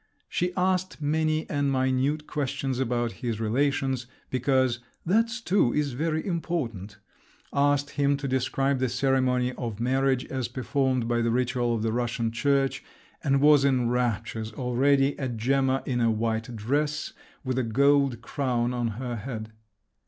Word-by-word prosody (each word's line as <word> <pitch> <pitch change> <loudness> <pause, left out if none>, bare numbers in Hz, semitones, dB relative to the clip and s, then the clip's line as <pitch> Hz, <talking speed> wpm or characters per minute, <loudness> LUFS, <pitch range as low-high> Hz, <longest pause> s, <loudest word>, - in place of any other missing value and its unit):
She 180 +1 -1
asked 185 -1 0
many 155 +1 0
and 145 -1 0
minute 130 +3 +1
questions 135 -3 -2
about 120 -2 0
his 115 -4 -2
relations, 130 +2 0 0.2
because 130 -1 +2 0.3
"that 225 +6 +2
too 180 -10 +3
is 150 -2 +1
very 155 +5 -1
important"; 125 - -3 0.6
asked 145 0 +2
him 140 -1 +1
to 140 -1 -4
describe 130 +1 0
the 130 -1 +1
ceremony 130 -1 +1
of 115 -5 -5
marriage 130 +1 +1
as 130 -3 -3
performed 130 0 0
by 120 0 +1
the 115 - +1
ritual 120 0 +1
of 110 - -2
the 110 -1 0
Russian 120 -1 -1
Church, 135 +2 +1 0.4
and 135 0 +2
was 145 -1 +6
in 130 -4 +2
raptures 115 -2 -1
already 135 +3 +2
at 130 -4 -3
Gemma 135 +3 +1
in 125 -2 -1
a 115 - +3
white 110 +1 -1
dress, 145 +7 -1 0.3
with 130 -1 -1
a - - +1
gold 140 +2 +3
crown 125 -4 -1
on 120 -1 -1
her 125 -2 -4
head. 110 -1 -6
130 Hz, 150 wpm, -27 LUFS, 120-140 Hz, 0.6 s, was